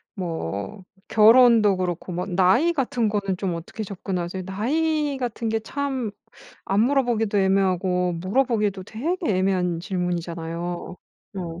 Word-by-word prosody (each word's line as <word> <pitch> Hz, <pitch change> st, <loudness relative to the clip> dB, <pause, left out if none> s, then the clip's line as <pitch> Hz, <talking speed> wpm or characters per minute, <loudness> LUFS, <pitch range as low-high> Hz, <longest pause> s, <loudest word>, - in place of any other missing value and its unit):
뭐 160 Hz, -, -4 dB, 0.2 s
결혼도 225 Hz, -2 st, +6 dB
그렇고 180 Hz, 0 st, -3 dB
뭐 180 Hz, +1 st, -3 dB
나이 190 Hz, -, +3 dB
같은 245 Hz, -5 st, 0 dB
거는 200 Hz, -3 st, -1 dB
좀 185 Hz, -3 st, -2 dB
어떻게 170 Hz, +6 st, -6 dB
접근하세요? 185 Hz, -2 st, -4 dB
나이 290 Hz, +8 st, 0 dB
같은 235 Hz, -2 st, -3 dB
게 225 Hz, 0 st, 0 dB
참 265 Hz, -1 st, -3 dB, 0.5 s
안 195 Hz, +2 st, +1 dB
물어보기도 235 Hz, -5 st, +2 dB
애매하고 185 Hz, -2 st, +2 dB
물어보기도 205 Hz, +1 st, 0 dB
되게 320 Hz, -, -3 dB
애매한 185 Hz, -3 st, +1 dB
질문이잖아요. 175 Hz, -1 st, -4 dB, 0.4 s
어. 170 Hz, -2 st, -5 dB
195 Hz, 290 characters per minute, -24 LUFS, 180-235 Hz, 0.5 s, 결혼도